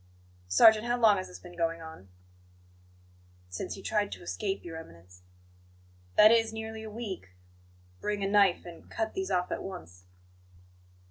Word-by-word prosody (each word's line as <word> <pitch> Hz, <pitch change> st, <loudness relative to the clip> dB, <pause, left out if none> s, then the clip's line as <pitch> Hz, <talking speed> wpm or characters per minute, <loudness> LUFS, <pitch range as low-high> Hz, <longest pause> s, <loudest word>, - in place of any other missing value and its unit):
"Sergeant, 215 Hz, -, +6 dB
how 240 Hz, 0 st, +1 dB
long 215 Hz, -3 st, +6 dB
has 185 Hz, -, -4 dB
this 180 Hz, -, -10 dB
been 175 Hz, -1 st, -13 dB
going 165 Hz, -1 st, -1 dB
on?" 160 Hz, -, -11 dB, 1.4 s
"Since 90 Hz, -, -5 dB
he 195 Hz, -, -11 dB
tried 205 Hz, -2 st, 0 dB
to -, -, -10 dB
escape, 195 Hz, +2 st, -3 dB
Your 165 Hz, -1 st, -7 dB
Eminence." 90 Hz, -, -13 dB, 0.9 s
"That 215 Hz, +1 st, +8 dB
is, 225 Hz, -1 st, +3 dB
nearly 220 Hz, 0 st, -6 dB
a 220 Hz, -, -7 dB
week? 195 Hz, -, -7 dB, 0.6 s
Bring 205 Hz, -1 st, -2 dB
a -, -, +1 dB
knife 200 Hz, -3 st, +4 dB
and 170 Hz, -1 st, -12 dB
cut 220 Hz, -1 st, -2 dB
these 190 Hz, 0 st, -3 dB
off 180 Hz, -2 st, 0 dB
at -, -, -2 dB
once." 90 Hz, -, -9 dB
190 Hz, 155 wpm, -30 LUFS, 165-220 Hz, 1.4 s, That